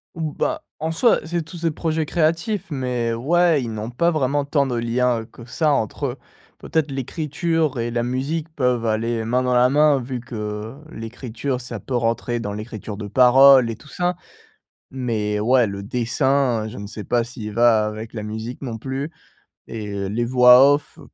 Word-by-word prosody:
Ou 160 Hz, -2 st, -3 dB
bah, 315 Hz, 0 st, -2 dB, 0.2 s
en 160 Hz, +1 st, -2 dB
soi 230 Hz, +8 st, +3 dB
c'est 170 Hz, 0 st, -2 dB
tous 170 Hz, +1 st, -10 dB
des 165 Hz, -, +2 dB
projets 160 Hz, 0 st, -1 dB
créatifs, 170 Hz, +6 st, 0 dB
mais 125 Hz, -4 st, -1 dB
ouais 165 Hz, +5 st, +2 dB
ils 115 Hz, -2 st, -4 dB
n'ont 110 Hz, +2 st, -5 dB
pas 170 Hz, +8 st, +2 dB
vraiment 145 Hz, -2 st, 0 dB
tant 140 Hz, -1 st, +1 dB
de 125 Hz, -, -2 dB
liens, 120 Hz, +1 st, +1 dB
heu, -, -, -9 dB
que 115 Hz, +1 st, -14 dB
ça 150 Hz, +5 st, 0 dB
entre 140 Hz, +2 st, -1 dB
eux. 125 Hz, +2 st, -5 dB, 0.4 s
Peut-être 160 Hz, -2 st, -1 dB
l'écriture 150 Hz, +1 st, -1 dB
et 115 Hz, 0 st, -2 dB
la 120 Hz, 0 st, 0 dB
musique 140 Hz, +6 st, -2 dB
peuvent 125 Hz, -4 st, +1 dB
aller 115 Hz, +1 st, 0 dB
main 125 Hz, +3 st, +1 dB
dans 125 Hz, 0 st, +1 dB
la 125 Hz, +1 st, +5 dB
main 145 Hz, -1 st, +4 dB
vu 125 Hz, 0 st, -5 dB
que 110 Hz, -2 st, -6 dB, 0.2 s
l'écriture 125 Hz, +2 st, -5 dB
ça 125 Hz, -, -6 dB
peut 130 Hz, -, -5 dB
rentrer 120 Hz, 0 st, 0 dB
dans 105 Hz, -3 st, -4 dB
l'écriture 105 Hz, -1 st, -7 dB
de 105 Hz, -1 st, -6 dB
parole 130 Hz, +1 st, +6 dB
et 115 Hz, -, -3 dB
tout 150 Hz, -, -18 dB
ça. 180 Hz, +2 st, -1 dB, 0.8 s
Mais 110 Hz, -5 st, -2 dB
ouais 120 Hz, +2 st, +4 dB
le 100 Hz, -1 st, -5 dB
dessin 125 Hz, +1 st, 0 dB
je 110 Hz, -, -9 dB
ne 100 Hz, 0 st, -6 dB
sais 105 Hz, 0 st, -8 dB
pas 120 Hz, +1 st, +1 dB
s'il 115 Hz, -3 st, -7 dB
va 115 Hz, -1 st, +4 dB
avec 110 Hz, +2 st, -7 dB
la 110 Hz, -, -4 dB
musique 110 Hz, +3 st, -6 dB
non 120 Hz, -5 st, -5 dB
plus 135 Hz, +5 st, -4 dB, 0.6 s
et 110 Hz, -2 st, -6 dB
heu, 100 Hz, -1 st, -3 dB
les 115 Hz, +4 st, -1 dB
voix 125 Hz, +2 st, +7 dB
off 145 Hz, 0 st, -4 dB
125 Hz, 190 wpm, -22 LUFS, 115-145 Hz, 0.8 s, voix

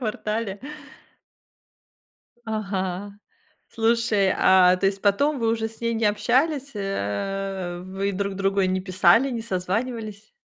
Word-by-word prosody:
квартале? 215 Hz, -3 st, -3 dB, 1.8 s
Ага. 200 Hz, -3 st, -3 dB, 0.6 s
Слушай, 225 Hz, -4 st, +2 dB
а 185 Hz, -1 st, +5 dB
то 195 Hz, +1 st, 0 dB
есть 195 Hz, 0 st, -1 dB
потом 280 Hz, +9 st, +2 dB
вы 230 Hz, -2 st, 0 dB
уже 225 Hz, 0 st, 0 dB
с 225 Hz, -, -14 dB
ней 230 Hz, 0 st, 0 dB
не 225 Hz, 0 st, -1 dB
общались, 260 Hz, +7 st, +1 dB
э 195 Hz, -, -3 dB
вы 195 Hz, +1 st, -3 dB
друг 200 Hz, +1 st, -2 dB
другу 195 Hz, 0 st, +1 dB
не 185 Hz, 0 st, +1 dB
писали, 200 Hz, +8 st, +3 dB
не 230 Hz, -2 st, -3 dB
созванивались? 215 Hz, -, -4 dB
200 Hz, 120 wpm, -24 LUFS, 190-225 Hz, 1.8 s, а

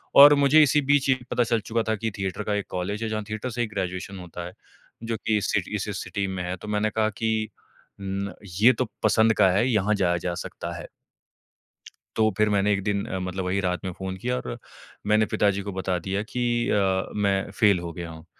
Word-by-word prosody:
और 145 Hz, +1 st, +10 dB
मुझे 145 Hz, +2 st, +5 dB
इसी 150 Hz, +1 st, +3 dB
बीच 140 Hz, 0 st, +2 dB
ये 130 Hz, -, +5 dB
भी 130 Hz, -, -12 dB
पता 120 Hz, -, +3 dB
चल 115 Hz, 0 st, +1 dB
चुका 115 Hz, +2 st, -1 dB
था 110 Hz, -, +2 dB
कि 110 Hz, +1 st, -3 dB
थिएटर 95 Hz, +1 st, -3 dB
का 105 Hz, -, -1 dB
एक 100 Hz, -, -3 dB
कॉलेज 100 Hz, +5 st, -3 dB
है, 110 Hz, -, -2 dB
जहाँ 110 Hz, -1 st, -2 dB
थिएटर 110 Hz, +4 st, -3 dB
से 120 Hz, +1 st, -3 dB
ही 120 Hz, -, 0 dB
ग्रेजुएशन 95 Hz, -1 st, -4 dB
होता 90 Hz, -1 st, -7 dB
है, 90 Hz, -, -7 dB, 0.5 s
जो 115 Hz, 0 st, -2 dB
कि 110 Hz, -1 st, +2 dB
इस 100 Hz, -, -1 dB
सिटी -, -, -1 dB
से -, -, -3 dB
सिटी 100 Hz, -1 st, -3 dB
में 95 Hz, -1 st, -4 dB
है। 90 Hz, +1 st, -3 dB
तो 100 Hz, -, -10 dB
मैंने 105 Hz, +1 st, 0 dB
कहा 110 Hz, 0 st, +1 dB
कि 110 Hz, 0 st, -1 dB, 0.5 s
उम, 100 Hz, 0 st, -3 dB, 0.3 s
"ये 125 Hz, +4 st, +7 dB
तो 130 Hz, -, -1 dB, 0.2 s
पसंद 115 Hz, 0 st, +4 dB
का 95 Hz, -3 st, +6 dB
है, 105 Hz, +7 st, +2 dB
यहाँ 105 Hz, -2 st, +2 dB
जाया 90 Hz, -3 st, +1 dB
जा 90 Hz, -, -1 dB
सकता -, -, -6 dB
है।" -, -, -8 dB, 1.3 s
तो 110 Hz, -1 st, +4 dB
फिर 105 Hz, 0 st, +3 dB
मैंने 105 Hz, 0 st, +2 dB
एक 100 Hz, -1 st, -2 dB
दिन 100 Hz, -1 st, -1 dB
अ, 95 Hz, -, -4 dB
मतलब 95 Hz, 0 st, -3 dB
वही 95 Hz, +2 st, 0 dB
रात 90 Hz, 0 st, -2 dB
में 95 Hz, -, -2 dB
फ़ोन 95 Hz, 0 st, -5 dB
किया 125 Hz, +6 st, -2 dB
और 120 Hz, -1 st, -5 dB, 0.5 s
मैंने 105 Hz, +1 st, +4 dB
पिताजी 100 Hz, -2 st, +1 dB
को 100 Hz, +1 st, -5 dB
बता 95 Hz, -1 st, -1 dB
दिया 95 Hz, +4 st, -2 dB
कि 120 Hz, +3 st, -3 dB, 0.3 s
अ, 95 Hz, -2 st, +2 dB
मैं 100 Hz, -1 st, +1 dB
फ़ेल 100 Hz, -2 st, +3 dB
हो 85 Hz, -1 st, -5 dB
गया 85 Hz, -1 st, -6 dB
हूँ। 80 Hz, 0 st, -11 dB
105 Hz, 230 wpm, -25 LUFS, 95-110 Hz, 1.3 s, और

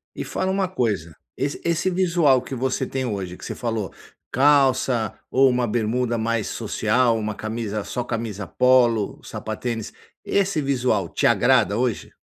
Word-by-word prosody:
e -, -, -4 dB
fala 185 Hz, 0 st, -2 dB
uma 190 Hz, 0 st, 0 dB
coisa, 105 Hz, -, -2 dB, 0.2 s
esse 140 Hz, +2 st, -2 dB
esse 170 Hz, +2 st, +1 dB
visual 170 Hz, -7 st, +3 dB
que 130 Hz, -, -8 dB
você 130 Hz, +1 st, -1 dB
tem 130 Hz, -1 st, -3 dB
hoje, 95 Hz, -6 st, -4 dB
que -, -, -14 dB
você -, -, -5 dB
falou 115 Hz, -5 st, -3 dB, 0.4 s
calça, 130 Hz, -5 st, +3 dB, 0.2 s
ou 135 Hz, +1 st, +5 dB
uma 125 Hz, -1 st, +1 dB
bermuda 120 Hz, +2 st, 0 dB
mais 115 Hz, -1 st, -1 dB
social, 120 Hz, -3 st, +1 dB
uma 105 Hz, -1 st, -3 dB
camisa 110 Hz, -1 st, -4 dB
só 125 Hz, -, -3 dB
camisa 110 Hz, -5 st, -4 dB
polo, 120 Hz, -2 st, +3 dB
sapatênis, 115 Hz, 0 st, -5 dB, 0.3 s
esse 195 Hz, -4 st, +1 dB
visual 125 Hz, -8 st, 0 dB
te -, -, +1 dB
agrada 100 Hz, -, +3 dB
hoje? 120 Hz, -3 st, -2 dB
120 Hz, 150 wpm, -23 LUFS, 110-135 Hz, 0.4 s, ou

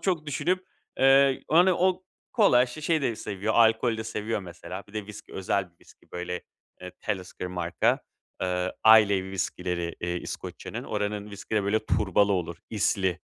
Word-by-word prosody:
çok 175 Hz, -5 st, -1 dB
düşünüp, 185 Hz, +6 st, -1 dB, 0.3 s
eee, 135 Hz, 0 st, +5 dB
hani, 175 Hz, +4 st, +6 dB
o 185 Hz, +1 st, +1 dB, 0.3 s
kolay, 130 Hz, -, +5 dB
şişeyi 155 Hz, +4 st, -1 dB
de 115 Hz, -4 st, 0 dB
seviyor, 105 Hz, +1 st, -3 dB
alkolü 115 Hz, 0 st, +4 dB
de 110 Hz, -, -4 dB
seviyor, 110 Hz, -1 st, -3 dB
mesela. 90 Hz, +1 st, -8 dB
Bir -, -, -17 dB
de 105 Hz, -2 st, -4 dB
viski 105 Hz, -1 st, -11 dB
özel 95 Hz, -1 st, -1 dB
bir 85 Hz, -, -38 dB
viski, -, -, -22 dB
böyle, 90 Hz, 0 st, -4 dB, 0.4 s
eee, 90 Hz, 0 st, -8 dB
Talisker 95 Hz, -3 st, -4 dB
marka. 90 Hz, -1 st, 0 dB, 0.4 s
Eee, 90 Hz, 0 st, -1 dB
Islay 105 Hz, -3 st, +7 dB
viskileri, 90 Hz, -2 st, -3 dB
eee, 85 Hz, 0 st, -2 dB
İskoçya'nın. -, -, -6 dB
Oranın 105 Hz, 0 st, -3 dB
viskileri 100 Hz, +1 st, -2 dB
böyle 110 Hz, +2 st, 0 dB
turbalı 100 Hz, 0 st, +2 dB
olur, 85 Hz, -3 st, -2 dB
isli 95 Hz, -4 st, 0 dB
105 Hz, 155 wpm, -27 LUFS, 90-125 Hz, 0.4 s, Islay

